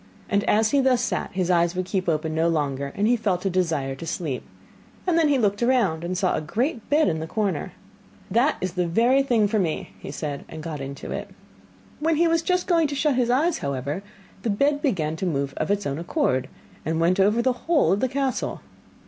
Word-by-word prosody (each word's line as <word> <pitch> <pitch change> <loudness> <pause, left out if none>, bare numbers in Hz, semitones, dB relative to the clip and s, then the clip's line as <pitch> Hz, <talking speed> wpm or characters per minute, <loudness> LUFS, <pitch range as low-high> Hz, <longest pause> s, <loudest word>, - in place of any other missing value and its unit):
And 200 0 +2
as 220 +1 +3
he 280 - +4
thus 260 -2 +3
sat, 245 - -1
his 185 -1 0
eyes 170 0 +2
would 185 0 -1
keep 185 -1 -1
open 155 0 -1
no 160 +1 +2
longer, 140 -4 -1
and 205 - +1
he 245 - +4
felt 200 -5 -1
a 195 - +1
desire 165 -7 0
to 150 +5 -8
sleep. 150 -6 -3 0.6
Then 335 -3 +3
he 285 -2 +3
looked 205 -3 +1
round 230 -10 +2
and 180 +1 -2
saw 185 -1 +1
a - - -1
great 235 - -2
bed 300 +2 +4
in 160 -3 0
the 160 - -4
corner. 205 +1 -2 0.6
'That 255 +6 +3
is 185 -1 -2
the 180 -1 0
very 235 +10 +3
thing 235 -6 +2
for 215 +1 0
me,' 165 -5 -2 0.2
said 145 -3 -4
he, - - -15
and 160 -1 -8
got 155 -3 -5
into 140 0 -6
it. - - -4 0.7
When 320 +2 +2
he 335 +2 +3
was 330 0 +2
just 360 +1 0
going 335 -3 +3
to 285 - -4
shut 295 +1 +2
his 245 -2 +1
eyes, 300 +7 +2
however, 140 +5 -3 0.4
the 225 - -2
bed 285 +8 +2
began 165 - 0
to 185 - -2
move 140 -4 -1
of - - -1
its 205 0 0
own 140 +2 -2
accord, 130 -6 0 0.3
and 160 +1 -1
went 175 +3 +2
over 210 +5 +3
the 255 0 +3
whole 300 - +4
of 195 - +2
the 260 - +1
castle. 270 0 -2
195 Hz, 225 wpm, -24 LUFS, 160-255 Hz, 0.7 s, he